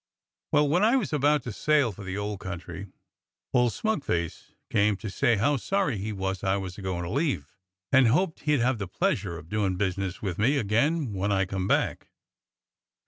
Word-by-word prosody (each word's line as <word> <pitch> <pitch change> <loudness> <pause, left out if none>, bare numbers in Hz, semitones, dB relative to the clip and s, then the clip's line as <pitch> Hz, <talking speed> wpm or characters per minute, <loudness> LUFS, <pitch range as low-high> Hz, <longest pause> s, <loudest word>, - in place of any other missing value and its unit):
Well, 150 0 +4
when 175 +7 +2
I 230 +4 +5
was 225 -12 0
about 145 -1 +3
to 125 - -5
sail 145 +2 +2
for 100 +1 -10
the 95 0 -4
old 105 -1 -3
country, 90 +1 -7 0.7
old 125 -2 +4
smug 220 - -1
face 85 - -3 0.2
came 105 -2 +3
to 105 -1 -6
say 120 +3 +2
how 140 +8 +2
sorry 185 - 0
he 105 +3 -3
was 95 -1 -3
I 95 +1 +2
was 95 -2 -5
a - - -7
goin' 90 -2 -3
to 85 - -4
leave, 135 - -1 0.4
and 130 -2 +6
hoped 160 +8 +1
he'd 150 -4 +1
have 125 -1 +1
the 100 - -3
pleasure 90 -1 -1
of 85 -1 -11
doin' 100 -1 0
business 95 -1 -2
with 95 -3 -4
me 135 +7 +3
again 130 +4 +1
when 100 +2 -1
I 95 -1 +2
come 95 0 -3
back. - - 0
105 Hz, 195 wpm, -27 LUFS, 95-140 Hz, 0.7 s, and